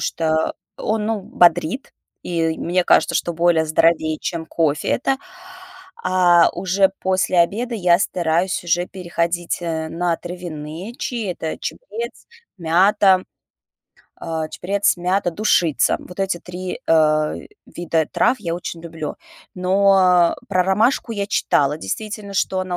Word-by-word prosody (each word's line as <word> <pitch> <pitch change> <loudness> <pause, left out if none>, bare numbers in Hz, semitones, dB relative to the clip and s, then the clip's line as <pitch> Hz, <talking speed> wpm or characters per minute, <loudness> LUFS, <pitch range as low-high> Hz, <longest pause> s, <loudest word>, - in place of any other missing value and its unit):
что 160 -1 0 0.2
он, 215 0 -1
ну, 225 -2 -1
б 190 - -17
бодрит, 175 - -6 0.3
и 165 -2 -1
мне 175 +1 0
кажется, - - +3
что 170 - 0
более 165 -1 +2
здоровее, 155 0 +2
чем 165 -2 -4
кофе 155 -2 0
это. 270 +1 +1 0.9
А 180 -2 +4
уже 190 +2 +2
после 185 -1 +1
обеда 230 +8 0
я 180 -4 +3
стараюсь 175 -1 0
уже 175 +1 +1
переходить, 170 -1 -2
э, 160 -1 -3
на 170 +1 -1
травяные 175 +3 -7
чаи. 225 -7 -3
Это 160 -2 -5
чабрец, 475 -1 -6 0.3
мята, 185 +3 +3 0.9
а, 160 -1 -4
чабрец, 200 +1 0
мята, 180 +1 0
душица. 175 -6 +2
Вот 180 +2 -9
эти 190 -2 -1
3, 180 +1 -6
э, 155 -1 +3 0.3
вида 165 -2 -1
трав 255 - +2
я 170 -4 -3
очень 170 -1 -6
люблю. 160 -2 -6 0.4
Но 195 +2 +3
а 180 -2 +4
про 185 -2 +2
ромашку 220 +6 +1
я 200 -2 -2
читала, 145 -7 +1
действительно, 205 - -5
что 185 0 0
она 185 -1 -3
175 Hz, 135 wpm, -20 LUFS, 165-195 Hz, 0.9 s, А